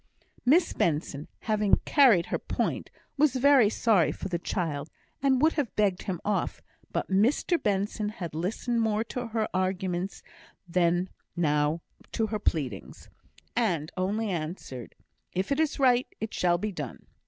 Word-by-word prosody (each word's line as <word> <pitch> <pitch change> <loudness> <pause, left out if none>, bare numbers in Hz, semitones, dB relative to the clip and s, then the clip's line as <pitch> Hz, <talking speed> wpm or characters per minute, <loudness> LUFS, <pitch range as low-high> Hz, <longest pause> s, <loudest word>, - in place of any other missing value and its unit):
Miss 325 +6 +5
Benson, 150 -2 -1
having 210 -2 +3
carried 240 - +5
her - - -2
point, - - -2 0.3
was 285 -2 +3
very 260 -4 +6
sorry 210 -7 +3
for 195 - -6
the 170 -2 -1
child, 155 -5 -2 0.3
and 265 -2 +3
would 320 - +5
have 290 -7 -2
begged 200 -3 +2
him 180 -4 -3
off; 210 -1 -1 0.3
but - - -2
Mr 245 - +2
Benson 205 +1 0
had 180 -7 -6
listened 225 +8 -1
more 220 -1 +1
to 245 +1 -5
her 220 -1 -1
arguments 185 0 -2 0.4
than 175 +1 +2 0.3
now 150 -1 +1 0.3
to 225 - +1
her 215 0 -3
pleadings, 135 - -3 0.5
and 180 -9 0
only 200 +3 -1
answered, 155 - -5 0.4
"If 190 +6 -2
it 280 - +1
is 315 -1 +1
right, 255 -3 +4
it 220 - -4
shall 175 -1 +2
be 210 +4 -3
done!" 150 -9 -7
195 Hz, 150 wpm, -28 LUFS, 175-230 Hz, 0.5 s, very